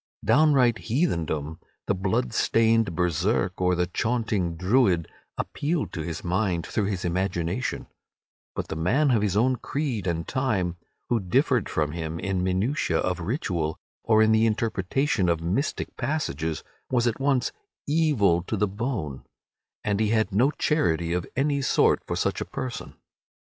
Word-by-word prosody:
Downright 135 -6 +4
heathendom, 80 - -1 0.3
the - - +1
blood 95 -10 -1
stained 115 -5 +2
Berserk 90 +2 0
or 90 0 +3
the 90 0 +1
chaunting 105 -3 -1
Druid, 95 - +2 0.3
appealed 155 +2 -2
to 80 - -3
his 80 0 -5
mind 90 -2 0
through 105 - -1
his 95 -3 -2
imagination, 90 +3 -1 0.7
but - - -4
the - - -3
man 125 - +2
of 115 -4 +3
his 105 -2 0
own 125 +3 +3
creed 125 - -3
and 80 -1 -2
time 100 -10 -1 0.3
who 120 - +2
differed 125 - +1
from 75 -1 0
him 80 0 -4
in 95 -2 -1
minutiae 100 +11 0
of 90 -1 -1
ritual, 85 - -2 0.3
or 110 -1 +4
in 110 - +4
the 110 +1 +4
interpretation 110 - 0
of 85 -1 +1
mystic 95 - -2
passages, 80 - -2 0.3
was 120 -2 +2
at 120 0 0
once 135 -2 +1 0.3
evil 145 - +3
to 105 +5 -3
the 105 - +2
bone, 100 - -4 0.6
and 105 -1 0
he 110 - +2
had 110 -2 +1
no 120 +8 +4
charity 85 - 0
of 90 -1 -2
any 140 +1 +1
sort 135 - +3
for - - -2
such - - -1
a - - -2
person. 130 -3 -6
100 Hz, 155 wpm, -26 LUFS, 85-125 Hz, 0.7 s, Downright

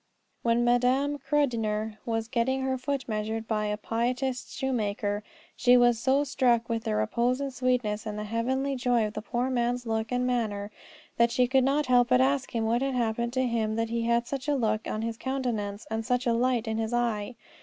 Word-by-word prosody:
When 235 0 +2
Madame 255 +4 +2
Krudener 225 -7 -1
was 225 -1 -1
getting 260 +3 0
her 265 0 0
foot 265 0 -3
measured 220 0 -3
by 215 -1 0
a 210 0 -1
pietist 245 +4 -2
shoemaker, 210 -5 -1 0.3
she 250 0 +5
was 240 -2 +4
so 270 +4 +2
struck 245 -4 +2
with 230 -1 -2
the 105 - 0
repose 235 - +1
and 280 -1 -3
the - - -17
sweetness 245 -5 0
and 210 0 -4
the 210 - -3
heavenly 260 +6 -1
joy 245 -3 +2
of 210 - -4
the 215 - -4
poor 245 +3 -2
man's 245 0 0
look 220 0 -2
and 250 0 +1
manner 215 -5 -1 0.5
that 235 0 +4
she 250 +1 +2
could 260 +1 +3
not 285 +3 +2
help 245 -1 +4
but 250 0 +4
ask 270 -1 +1
him 225 -1 0
what 235 +2 +1
had 270 -1 -1
happened 235 0 -1
to 260 0 +1
him 225 -3 0
that 225 0 -1
he 235 0 0
had 235 +1 +1
such 270 +1 -5
a 295 - +2
look 220 -4 0
on 215 - -3
his 230 -1 -3
countenance 230 -7 -3
and 225 0 -1
such 250 +3 0
a 235 - +2
light 240 -1 +1
in 220 0 -1
his 225 +1 -2
eye. 235 -1 -1
240 Hz, 210 wpm, -28 LUFS, 220-255 Hz, 0.5 s, she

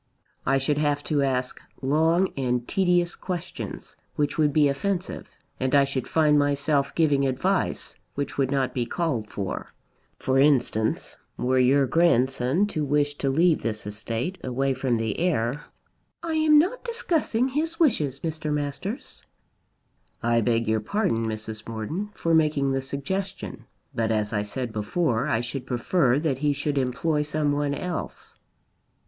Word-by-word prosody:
I 135 - +4
should 145 +2 0
have 145 -1 +1
to 150 -3 +1
ask 130 -2 -1 0.2
long 160 +7 +2
and 125 -2 -1
tedious 175 -2 +2
questions, 180 -3 -6 0.2
which 145 -1 0
would 150 -2 +3
be 150 0 +4
offensive. 180 +7 -2 0.3
And 130 +2 +1
I 140 - +6
should 135 -2 -2
find 150 -2 +4
myself 145 0 +1
giving 145 -4 +3
advice, 130 -1 -1 0.2
which 140 0 -3
would 135 -2 +1
not 135 -2 0
be 120 -2 -1
called 135 -12 -2
for. 95 -2 -5 0.4
For 130 0 +1
instance, 125 -6 +2 0.2
were 130 +1 +1
your 135 +2 +4
grandson 135 +1 +2
to 155 -6 -2
wish 145 0 +1
to 135 - 0
leave 165 +4 +3
this 110 -2 -3
estate 115 - -3
away 135 +2 0
from 130 -2 0
the 110 -2 -2
heir 150 -5 0 0.3
" - - -46
"I 330 -1 -2
am 310 -1 +5
not 360 +11 +2
discussing 320 - 0
his 320 +5 -2
wishes, 150 - +2
Mr. 160 -2 -3
Masters." 150 - -4 1.0
"I 115 0 +3
beg 115 0 +1
your 110 0 +2
pardon, 115 - 0
Mrs. 110 0 -5
Morton, 150 - -4
for 165 - 0
making 150 -4 +3
the 135 0 0
suggestion; 190 +9 -4 0.3
but 115 -1 0
as 105 -1 0
I 105 - +1
said 115 +3 -4
before, 115 +4 0
I 115 -6 +1
should 125 +2 -5
prefer 125 +1 +2
that 145 -4 -1
he 145 0 +2
should 140 0 -1
employ 140 +4 0
some 150 0 0
one 145 0 0
else." 175 +3 -5
140 Hz, 155 wpm, -25 LUFS, 125-165 Hz, 1.0 s, I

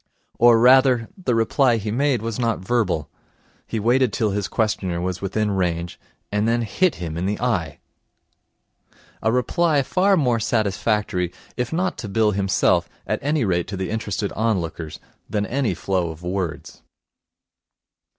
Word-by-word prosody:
Or, 120 -1 +7
rather, 125 0 +5
the 155 - -1
reply 115 +2 +3
he 105 -1 -3
made 130 -1 +1
was 115 0 -3
not 115 -3 +1
verbal. 95 -7 0 0.6
He 115 - -2
waited 120 +2 +2
till 105 +1 0
his 100 -1 -2
questioner 95 -6 -1
was 90 0 -3
within 105 +2 -1
range, 85 -3 -2 0.3
and 105 +2 +1
then 120 +1 +1
hit 150 - +1
him 80 -2 -5
in 90 +2 -1
the 105 - -2
eye. 95 - -1 1.4
A 110 - +2
reply 145 +5 +2
far 190 +7 +2
more 125 -7 +2
satisfactory, 105 -4 0 0.2
if 125 -1 -2
not 180 +3 -1
to 110 - -5
Bill 110 +1 +2
himself, 95 -1 +1 0.2
at - - -1
any 145 -2 +1
rate 85 -3 0
to 100 -1 -5
the 95 +1 -3
interested 105 -2 -2
onlookers, 85 -8 -2 0.3
than 105 -1 -1
any 120 -6 -1
flow 90 -1 -1
of 80 +1 -9
words. 90 -2 -4
110 Hz, 150 wpm, -22 LUFS, 95-125 Hz, 1.4 s, Or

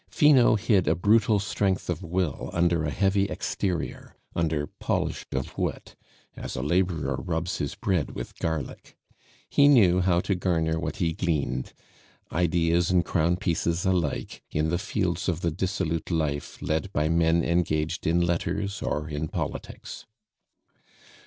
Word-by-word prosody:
Finot 130 -8 +5
hid 95 -7 +3
a 80 - +3
brutal 105 +4 +3
strength 100 -1 -1
of 90 -1 -2
will 90 -2 -2
under 85 -1 +2
a 75 - 0
heavy 95 +4 +2
exterior, 90 -4 -3 0.2
under 80 -3 0
polish - - -3
of 65 - -3
wit, - - -3 0.4
as - - -6
a 65 - -3
laborer 80 -4 0
rubs 85 +4 -2
his 70 - -3
bread 90 -6 -1
with - - -6
garlic. 80 -5 -4 0.5
He 145 - +5
knew 100 -11 +6
how 90 -1 +3
to 100 - 0
garner 80 -3 0
what - - -3
he 85 -6 0
gleaned, 70 -8 -1 0.6
ideas 85 0 +2
and 90 -1 +3
crown 85 +2 +1
pieces 85 -1 -1
alike, 90 -6 -1
in 75 +1 0
the 85 +1 0
fields 95 -3 -1
of 85 -1 -2
the 85 - 0
dissolute 85 -2 -2
life 75 -4 -2
led 80 +5 -1
by 75 +1 +1
men 85 +1 +3
engaged 85 -1 0
in 85 +2 +3
letters 85 +4 -1
or 75 +1 -2
in 75 +1 -3
politics. - - -6
85 Hz, 145 wpm, -26 LUFS, 80-95 Hz, 0.6 s, knew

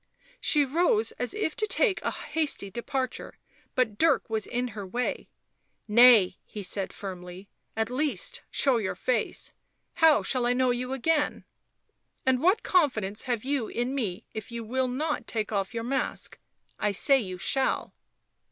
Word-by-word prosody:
She 295 -2 +4
rose 265 -7 +2
as 245 - -1
if 410 -6 -2
to 430 - 0
take 420 -3 +2
a - - -1
hasty 295 -11 -2
departure; 255 +3 -4 0.4
but 220 -5 0
Dirk 325 -3 +3
was 220 -1 -1
in 245 +1 -2
her 210 -2 -7
way. 240 +6 -3 0.3
" - - -48 0.2
Nay," 220 -4 +6
he 210 - -8
said 195 +1 -1
firmly. 185 0 -8
" - - -35
At 220 +2 0
least 260 - -2
show 270 -3 +3
your 210 -4 -2
face 255 - -2 0.2
— - - -49
how 320 -2 +6
shall 250 -2 0
I 245 - +3
know 255 0 +2
you 250 +1 -3
again? 295 +3 0 0.8
And 260 -1 +2
what 375 +7 +3
confidence 220 - +1
have 240 -4 -1
you 270 -5 0
in 245 +3 -2
me 210 -10 -3
if 220 +2 -7
you 235 -1 -5
will 255 +3 0
not 295 +5 -2
take 220 -2 -3
off 195 -1 -1
your 230 -1 -4
mask? 265 +3 -2 0.4
I 210 -1 +1
say 270 +7 +4
you 185 -6 -5
shall." 265 +8 0
245 Hz, 170 wpm, -27 LUFS, 215-275 Hz, 0.8 s, Nay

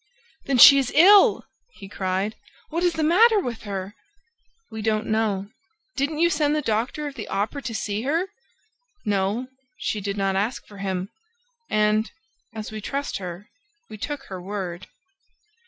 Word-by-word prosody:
"Then 275 -2 +1
she 275 +3 +10
is 260 -3 -1
ill!" 390 +6 +7 0.3
he 195 - -11
cried. 190 +2 -2 0.4
"What 335 +3 -1
is 350 -1 +2
the 320 - -1
matter 425 +8 +5
with 240 - -5
her?" 195 -1 -5 0.8
"We 220 0 -6
don't 215 0 0
know." 210 -2 -1 0.4
"Didn't 285 +3 -1
you 340 +2 +4
send 295 -1 +1
the 305 - -1
doctor 235 +6 -1
of 290 - -5
the 230 -6 -7
Opera 210 +8 -2
to 235 -3 -5
see 210 0 -2
her?" 315 +8 0 0.8
"No, 205 +4 0 0.3
she 210 - -3
did 200 +1 -3
not 195 -1 0
ask 210 +6 -2
for 205 -1 -14
him; 190 -1 -3 0.6
and, 215 0 +2 0.4
as 220 -1 -7
we 215 0 -6
trust 280 +4 -3
her, 180 +1 -7 0.4
we 215 - -7
took 290 +4 -4
her 190 -8 -8
word." 185 -2 -5
215 Hz, 160 wpm, -24 LUFS, 200-280 Hz, 0.8 s, she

